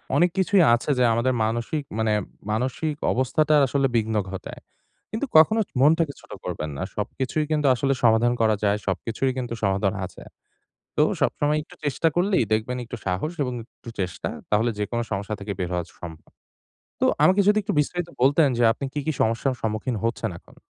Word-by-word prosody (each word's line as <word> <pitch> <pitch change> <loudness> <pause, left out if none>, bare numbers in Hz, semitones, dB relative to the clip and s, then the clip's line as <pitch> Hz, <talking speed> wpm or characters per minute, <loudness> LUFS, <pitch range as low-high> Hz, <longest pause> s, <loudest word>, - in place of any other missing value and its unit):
অনেক 175 - +4
কিছুই 190 -1 +4
আছে, 120 +5 -5
যা - - +4
আমাদের 125 +3 +1
মানসিক 120 +7 -2 0.2
মানে 110 -1 +1 0.4
মানসিক 130 +7 -1 0.2
অবস্থাটার 150 +4 +2
আসলে 140 +1 +1
বিঘ্ন 110 -1 +1 0.2
ঘটায়। 95 - -7 0.5
কিন্তু 220 +6 -2
কখনো 215 +8 +6 0.2
মনটাকে 155 0 +4
ছোট - - -19
করবেন 75 - -3
না। - - -5
সবকিছুই 130 +8 -2
কিন্তু 150 -2 +2
আসলে 135 +2 +1
সমাধান 115 +1 +4
করা 110 -1 +4
যায়। 100 0 +3
সবকিছুরই 115 +8 -1
কিন্তু 120 -2 -3
সমাধান 95 0 +1
আছে। 90 - -15 0.8
তো - - +4 0.2
সবসময় 150 +1 +1
একটু - - -16
চেষ্টা 145 +3 +1
করলেই, 185 +2 +3
দেখবেন 110 +4 0
একটু 115 - -7
সাহস 95 - -1
এবং 125 -2 -2 0.2
একটু 115 - -11
চেষ্টা, 90 -2 -3 0.2
তাহলে 110 +3 +2
যেকোন 110 +3 -2
সমস্যা 100 +2 -2
থেকে 100 +1 -4
বের 90 -1 -2
হওয়া 90 -1 -1 0.2
সম্ভব। 80 -2 -10 0.7
তো - - +2 0.2
আমাকে 190 +2 +5
যদি 210 +1 +5
একটু 205 0 -2
বিস্তারিত 175 +3 -1
বলতেন 145 +4 +5
যে, 120 - +2
আপনি 140 - -5
কী, 150 - -2
কী 155 - 0
সমস্যার 115 +4 +1
সম্মুখীন 110 +2 -2
হচ্ছেন 115 -3 -1
এখন? - - -21
125 Hz, 175 wpm, -24 LUFS, 110-150 Hz, 0.8 s, কখনো